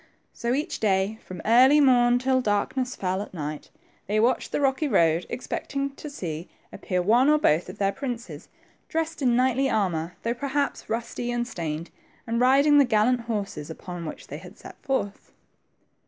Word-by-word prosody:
So, 235 +1 -1
each 300 +5 -3
day, 200 +1 +1
from 180 -2 -9
early 255 +6 +6
morn 245 -3 +5
till 260 +1 +1
darkness 250 +4 -1
fell 190 0 -2
at 205 - -9
night, 150 -1 -5 0.4
they 210 +2 +1
watched 235 +4 +1
the - - -1
rocky, 275 +2 +1
road, 170 - +2
expecting 275 +2 -3
to 295 +2 -9
see 170 - -6 0.2
appear 180 -1 -2
one 240 +8 +4
or 305 - +5
both 175 - +2
of 185 - -9
their 195 -1 +1
princes, 245 -2 -6 0.4
dressed 325 -1 -2
in 245 -3 +3
knightly 260 +2 +2
armor, 180 -6 -1
though 230 - 0
perhaps 280 +3 -2
rusty 235 +1 -3
and 240 0 -1
stained, 165 -5 -5 0.3
and 230 +1 -1
riding 280 +3 +5
the - - +7
gallant 245 +1 +2
horses 200 -9 -3
upon 170 +1 -7
which - - -8
they - - -8
had - - -13
set - - -13
forth. 235 -8 -3
235 Hz, 170 wpm, -25 LUFS, 190-265 Hz, 0.4 s, the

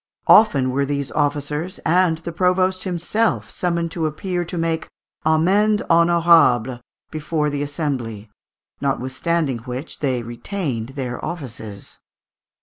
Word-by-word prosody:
Often 140 -12 +5
were 140 +2 +1
these 140 -1 -2
officers 150 +4 -1
and 170 0 +3
the 165 +1 -6
provost 185 +2 +1
himself 190 +5 0
summoned 170 -2 -1
to 165 -2 -1
appear 175 +4 -3
and 175 - -3
make 165 -1 -1 0.4
amende 200 +8 +3
honourable 165 -8 +4 0.3
before 155 -1 -1
the 145 0 -2
assembly, 135 -8 -3 0.5
notwithstanding 135 +1 -1
which 125 +5 -7
they 130 -4 -1
retained 120 - -4
their 125 -3 -4
offices. 115 - -7
155 Hz, 115 wpm, -21 LUFS, 130-175 Hz, 0.5 s, Often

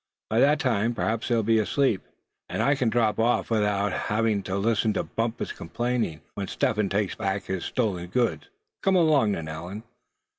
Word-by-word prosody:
"By 110 - +3
that 145 +4 +4
time, 120 -5 +1
perhaps 110 0 -1
they'll 115 -2 +2
be 110 +1 +3
asleep, 110 -1 +1 0.5
and - - -1
I 140 - +4
can 130 -4 +1
drop 110 -2 +1
off 120 +1 +1
without 105 -2 +1 0.3
being 110 -2 +2
made 100 - -5
to 95 - -2
listen 110 +1 +1
to - - -1
Bumpus' 115 0 -3
complaining, 115 -3 -2
when 100 -1 -4
Step 110 - 0
Hen 105 -2 +1
takes 100 0 0
back 95 0 -2
his 95 -2 -4
stolen 100 -8 -1
goods. 120 - -1 0.3
Come 195 -1 +3
along, 150 - +4
then, 80 -4 -4
Allan." 85 +7 -6
110 Hz, 185 wpm, -26 LUFS, 100-120 Hz, 0.5 s, that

